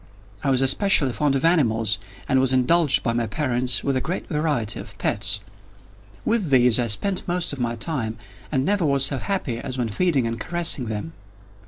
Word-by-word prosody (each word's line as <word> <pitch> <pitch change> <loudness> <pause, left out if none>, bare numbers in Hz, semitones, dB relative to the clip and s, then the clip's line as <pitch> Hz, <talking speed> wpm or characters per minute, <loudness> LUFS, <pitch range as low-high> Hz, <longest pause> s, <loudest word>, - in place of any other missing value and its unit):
I 140 - 0
was 130 0 +2
especially 135 - +2
fond 145 0 0
of 135 - 0
animals, 115 - +2 0.3
and 130 - +2
was 130 -1 +3
indulged 145 +4 +3
by 115 - 0
my 115 -1 -1
parents 125 -4 +1
with 140 - 0
a 130 - 0
great 175 +3 -4
variety 150 - -1
of - - -11
pets. 105 0 +1 0.8
With 220 -7 0
these 125 -3 +4
I 120 - +1
spent 185 - -1
most 175 -3 0
of 140 - -7
my 120 -1 -1
time, 115 -3 -3 0.3
and 135 -2 0
never 200 0 +1
was 140 -3 +3
so 135 -1 0
happy 155 - -3
as 130 +1 -5
when 120 -3 -1
feeding 140 - +1
and 115 0 -3
caressing 170 -7 0
them. 110 +9 -5
130 Hz, 190 wpm, -23 LUFS, 120-160 Hz, 0.8 s, these